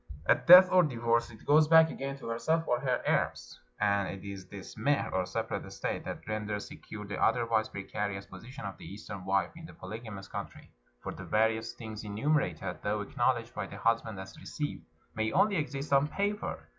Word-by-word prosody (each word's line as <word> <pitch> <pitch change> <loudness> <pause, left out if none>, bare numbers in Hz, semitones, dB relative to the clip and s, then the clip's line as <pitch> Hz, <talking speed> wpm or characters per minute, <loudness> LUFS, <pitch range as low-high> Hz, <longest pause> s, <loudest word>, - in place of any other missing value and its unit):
At - - +2
death 180 +2 +11
or 185 - +7
divorce 120 -6 +1
it 110 - -14
goes 150 +1 +5
back 160 0 +7
again 135 0 -5
to 135 - -8
herself 160 +8 0
or 120 - +2
her 130 -1 -1
heirs. - - -1 0.2
And 100 -1 +2
it 95 - -7
is 95 -2 -7
this 100 -1 -10
mehr, 145 +1 +1
or 90 -1 0
separate - - -3
estate, - - -4
that - - -6
renders 105 -1 -3
secure 105 -1 -9
the 100 - -5
otherwise 115 -3 +2
precarious 100 0 -4
position 115 +7 -10
of 100 - -6
the - - -10
Eastern 100 -2 -8
wife 95 -2 +1
in 165 0 -10
a - - -13
polygamous 100 0 -8
country; - - -8 0.3
for - - -5
the - - -9
various 110 +1 +1
things 110 -2 -7
enumer 115 +7 +1
ated, 90 0 -6
though 105 +1 -1
acknowledged 100 - 0
by - - -4
the - - -9
husband 115 -3 0
as 95 +11 -9
received, 150 -2 -5 0.3
may 110 0 -1
only 205 -2 +3
exist 145 -2 -3
on 140 +1 +5
paper. 205 +5 -2
110 Hz, 195 wpm, -30 LUFS, 100-140 Hz, 0.3 s, death